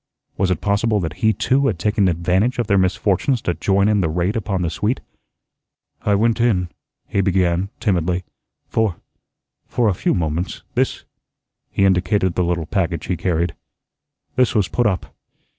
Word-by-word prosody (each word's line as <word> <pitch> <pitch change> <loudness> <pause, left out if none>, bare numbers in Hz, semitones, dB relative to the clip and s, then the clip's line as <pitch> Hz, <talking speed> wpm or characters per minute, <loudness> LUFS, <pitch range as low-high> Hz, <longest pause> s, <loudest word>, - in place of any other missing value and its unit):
Was 95 -1 +1
it 90 -3 0
possible 105 +2 +1
that 80 -3 -4
he 110 - +4
too 135 +5 +1
had 105 - 0
taken 105 +2 +1
advantage 90 +7 +1
of 120 - 0
their 100 -2 +3
misfortunes 100 +6 +1
to 90 - 0
join 95 +4 +2
in 105 -2 +3
the 80 - +1
raid 90 +5 0
upon 95 -4 -1
the 85 - -1
suite? 105 +9 -1 1.0
"I 105 - +2
went 115 +3 +2
in," 95 -7 +2 0.4
he 100 - +1
began, 90 -1 +1
timidly, 90 -2 0 0.4
"for 110 -6 0 0.7
for 120 -2 +1
a - - +2
few - - 0
moments. 85 +1 -2
This" - - 0 0.7
he 100 - +1
indicated 95 0 +2
the 90 - +1
little 85 -1 -1
package 85 -1 -1
he 90 - -1
carried 85 0 0 0.8
"this 125 -1 +2
was 105 -4 +3
put 120 -2 +1
up. 95 -3 -2
95 Hz, 165 wpm, -20 LUFS, 90-105 Hz, 1.0 s, he